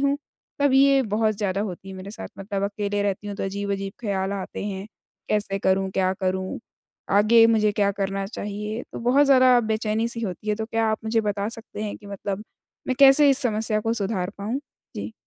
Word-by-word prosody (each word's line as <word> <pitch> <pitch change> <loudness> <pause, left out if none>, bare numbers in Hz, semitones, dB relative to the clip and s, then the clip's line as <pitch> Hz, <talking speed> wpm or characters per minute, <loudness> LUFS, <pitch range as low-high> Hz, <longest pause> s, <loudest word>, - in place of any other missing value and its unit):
हूँ, 280 0 +2 0.4
तब 285 -1 +3
ये 275 0 +5
बहुत 215 -1 +1
ज़्यादा 195 -1 -1
होती 195 -2 -5
है 190 - -7
मेरे 190 +1 -8
साथ 215 - -8
मतलब 195 0 -3
अकेले 205 0 -2
रहती 200 0 -2
हूँ, 205 - -5
तो - - -3
अजीब-अजीब 195 0 -3
ख़याल 195 -3 -1
आते 200 0 -5
हैं। 195 -1 -4 0.4
कैसे 205 -2 0
करूँ? 190 0 +1
क्या 185 0 +1
करूँ? 185 0 -2 0.5
आगे 225 +3 +6
मुझे 215 -2 +3
क्या 200 -1 +2
करना 195 0 -2
चाहिए? 210 +2 -5
तो - - -5
बहुत 265 +5 +4
ज़्यादा 255 -2 +6
बेचैनी-सी 220 +1 -1
होती 210 0 -5
है। 210 - +2
तो 220 - -3
क्या 225 0 0
आप 215 - 0
मुझे 225 +1 +2
बता 205 -1 -1
सकते 225 -2 -7
हैं 210 -1 -4
कि 205 - -15
मतलब 200 +1 -5 0.4
मैं 260 - +1
कैसे 280 +1 +8
इस 270 - +4
समस्या 220 -2 0
को 225 +1 0
सुधार 195 -4 -2
पाऊँ? 220 +7 -2 0.4
जी। 105 +2 -5
210 Hz, 195 wpm, -24 LUFS, 195-225 Hz, 0.5 s, कैसे